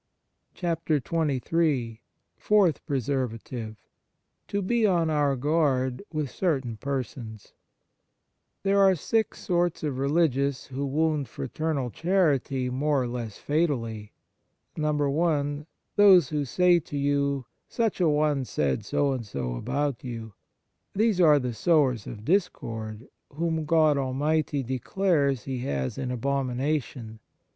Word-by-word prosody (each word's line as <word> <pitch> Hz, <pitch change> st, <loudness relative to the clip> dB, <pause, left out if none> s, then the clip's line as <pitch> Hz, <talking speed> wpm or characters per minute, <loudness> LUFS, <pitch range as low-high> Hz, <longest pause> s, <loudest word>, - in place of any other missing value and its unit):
54 165 Hz, -3 st, 0 dB, 0.3 s
XXIII 130 Hz, -4 st, 0 dB, 0.3 s
FOURTH 200 Hz, -7 st, +2 dB
PRESERVATIVE 125 Hz, -4 st, -3 dB, 0.7 s
To 200 Hz, -, -1 dB
be 235 Hz, +4 st, +1 dB
on 170 Hz, -4 st, +2 dB
our 145 Hz, -2 st, +2 dB
guard 135 Hz, -3 st, +1 dB
with 155 Hz, -4 st, -2 dB
certain 135 Hz, -10 st, -1 dB
persons 120 Hz, -5 st, -5 dB, 1.1 s
THERE 200 Hz, 0 st, +3 dB
are 195 Hz, -1 st, +6 dB
six 220 Hz, +7 st, -1 dB
sorts 175 Hz, -3 st, 0 dB
of 140 Hz, -4 st, -2 dB
religious 140 Hz, -2 st, +1 dB
who 140 Hz, +1 st, -4 dB
wound 150 Hz, -2 st, 0 dB
fraternal 135 Hz, -, -3 dB
charity 145 Hz, -, +1 dB
more 140 Hz, +1 st, +1 dB
or -, -, -2 dB
less 120 Hz, -4 st, -5 dB
fatally, 115 Hz, -9 st, -1 dB, 0.6 s
(i) 150 Hz, 0 st, +1 dB, 0.4 s
Those 190 Hz, -8 st, +7 dB
who 150 Hz, -2 st, -1 dB
say 175 Hz, +6 st, +4 dB
to 145 Hz, -2 st, -7 dB
you, 140 Hz, -1 st, 0 dB
" -, -, -49 dB
Such 225 Hz, -5 st, -1 dB
a 170 Hz, -, +4 dB
one 150 Hz, -2 st, +1 dB
said 70 Hz, -, -1 dB
so 145 Hz, -1 st, +1 dB
and 130 Hz, -3 st, -2 dB
so 70 Hz, -, -4 dB
about 135 Hz, -, -2 dB
you." 115 Hz, -4 st, -6 dB, 0.6 s
These 210 Hz, -2 st, +2 dB
are 155 Hz, -3 st, +7 dB
the 125 Hz, -3 st, -2 dB
sowers 130 Hz, -, +2 dB
of 110 Hz, -1 st, -8 dB
discord, 115 Hz, -, -2 dB, 0.3 s
whom 160 Hz, +1 st, -1 dB
God 155 Hz, -2 st, +3 dB
Almighty 145 Hz, +2 st, 0 dB
declares 140 Hz, +1 st, 0 dB
He 130 Hz, -2 st, -4 dB
has 70 Hz, -, -3 dB
in 130 Hz, -2 st, -3 dB
abomination. 130 Hz, -2 st, -2 dB
140 Hz, 120 wpm, -26 LUFS, 125-160 Hz, 1.1 s, Those